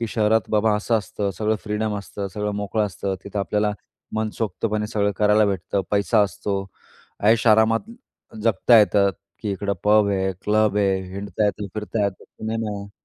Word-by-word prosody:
की 115 - -1
शहरात 110 -2 +1
बाबा, 110 0 +3
असं 110 +2 +1
असतं, 100 0 -3
सगळं 110 0 +1
फ्रीडम 105 0 -1
असतं, 100 0 -6
सगळं 105 0 -2
मोकळं 105 +1 0
असतं. 95 0 -3
तिथं 100 +1 -5
आपल्याला 105 +1 0 0.4
मनसोक्तपणे 110 0 -2
सगळं 105 -1 0
करायला 105 0 +4
भेटतं, 95 0 -1
पैसा 100 0 +3
असतो. 100 0 -2 0.6
ऐशोआरामात 110 - +4 0.5
जगता 115 +2 +5
येतं 100 -2 +4 0.3
की 105 -3 -1
इकडं 100 +1 -2
पब 105 0 +5
आहे, 95 -1 0
क्लब 105 0 +2
आहे, 95 -2 +2
हिंडता 100 +2 -2
येत, 105 0 -1
फिरता 105 0 -1
येत, 100 -2 -3
सिनेमा 110 -1 -4
आहे. 100 0 -9
105 Hz, 155 wpm, -23 LUFS, 100-110 Hz, 0.6 s, जगता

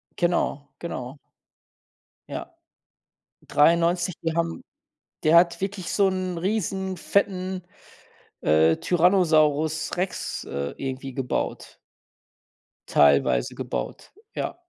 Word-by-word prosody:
Genau, 170 -5 0
genau. 130 -5 -6 1.1
Ja. - - -6 1.0
93, 170 +3 +3
die 165 -1 -1
haben 170 0 -1 0.6
der 155 +2 +5
hat 170 +1 +5
wirklich 195 -2 -3
so 200 -2 +3
'n 185 -2 -3
riesen, 190 0 -1
fetten, 185 0 -1 0.8
äh, 80 +1 +4
Tyrannosaurus 160 -4 +2
Rex, 180 +1 -3
äh, 70 0 -4
irgendwie 135 0 -5
gebaut. 130 -1 -3 1.1
Teilweise 70 -4 +3
gebaut, - - -5 0.2
ja. - - -3
170 Hz, 90 wpm, -25 LUFS, 140-185 Hz, 1.1 s, der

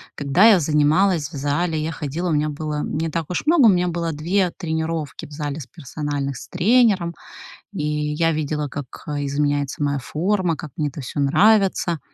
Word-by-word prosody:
когда 145 +8 +3
я 195 -5 +6
занималась 150 +2 +2
в - - -9
зале, 150 +3 -1
я 160 - -2
ходила, 165 +3 -3
у - - 0
меня 150 0 +1
было 150 0 -3
не 160 +2 -2
так 160 0 -3
уж 180 - -2
много, 310 -5 +5
у - - +8
меня 180 -2 +2
было 170 -1 -2
2 175 +5 0
тренировки 160 -2 -3
в - - -15
зале 145 0 -4
с 130 - -9
персональных 140 -2 -4
с - - -10
тренером. 190 -3 +2 0.6
И 165 -7 -3 0.3
я 165 +2 +2
видела, 150 -1 -2
как, 145 +1 -5 0.2
э, 145 -1 -2
изменяется 145 0 -1
моя 140 -1 0
форма, 180 +4 0
как 150 -1 -9
мне 150 -2 0
это 145 +2 -8
всё 135 - -5
нравится, 185 +2 +3
155 Hz, 190 wpm, -21 LUFS, 145-175 Hz, 0.6 s, у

